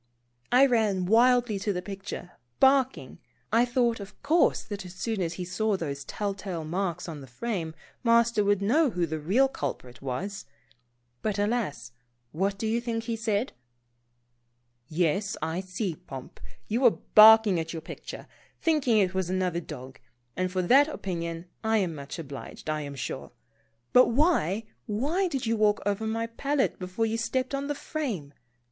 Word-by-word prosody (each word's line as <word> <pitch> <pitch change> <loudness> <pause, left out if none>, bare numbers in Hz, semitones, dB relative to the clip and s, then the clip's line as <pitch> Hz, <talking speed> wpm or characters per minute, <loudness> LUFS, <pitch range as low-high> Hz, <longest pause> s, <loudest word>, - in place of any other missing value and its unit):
I 255 +3 +7
ran 215 -7 +2
wildly 235 +1 +4
to 205 +1 -1
the 180 -2 -3
picture, 195 -2 -7 0.3
barking. 265 -1 +3 0.3
I 235 +2 +5
thought, 240 -2 +1
of 200 0 -10
course, 330 +2 +3
that 205 -2 -6
as 180 0 -10
soon 220 0 -2
as 170 -1 -1
he 180 +1 -5
saw 205 +3 0
those 145 -5 -4
telltale 195 -5 -4
marks 175 +1 -2
on 155 -4 -6
the 135 - -11
frame. 165 - -4 0.3
Master 235 -2 +4
would 200 -1 +2
know 285 +9 +3
who 180 -5 0
the 160 -1 -4
real 205 - +3
culprit 130 - -6
was. 180 +11 -4 0.7
But 210 -2 -1
alas, 205 - -1 0.4
what 195 +5 -1
do 220 - -3
you 225 +2 +1
think 230 -1 -2
he 230 0 -2
said? 225 +1 -1 1.3
Yes, 175 +4 0
I 160 +2 -2
see. 185 -1 -3
Pomp, 135 -3 -10 0.3
you 230 +4 0
were 250 - +8 0.2
barking 215 -3 +8
at 160 0 -4
your 165 -2 -6
picture, - - -8 0.3
thinking 295 -8 +2
it 190 -3 +2
was 190 -2 -1
another 180 -2 0
dog, 130 -4 -9 0.4
and 185 0 -1
for 185 0 0
that 270 +10 +6
opinion 170 - -4 0.2
I 220 0 +2
am 185 -5 0
much 140 -2 -7
obliged, 145 0 -7
I 155 0 -2
am 140 -1 -6
sure. 130 0 -5 0.6
But 250 - +7
why, 230 - +2 0.2
why 290 - 0
did 270 -8 -3
you 230 0 +1
walk 210 -1 +3
over 205 +2 0
my 225 +1 -1
palette 275 +4 -1
before 185 +5 -2
you 225 +1 -1
stepped 255 +3 -1
on 275 0 -2
the 290 - -2
frame? 225 - -4
205 Hz, 165 wpm, -27 LUFS, 175-235 Hz, 1.3 s, were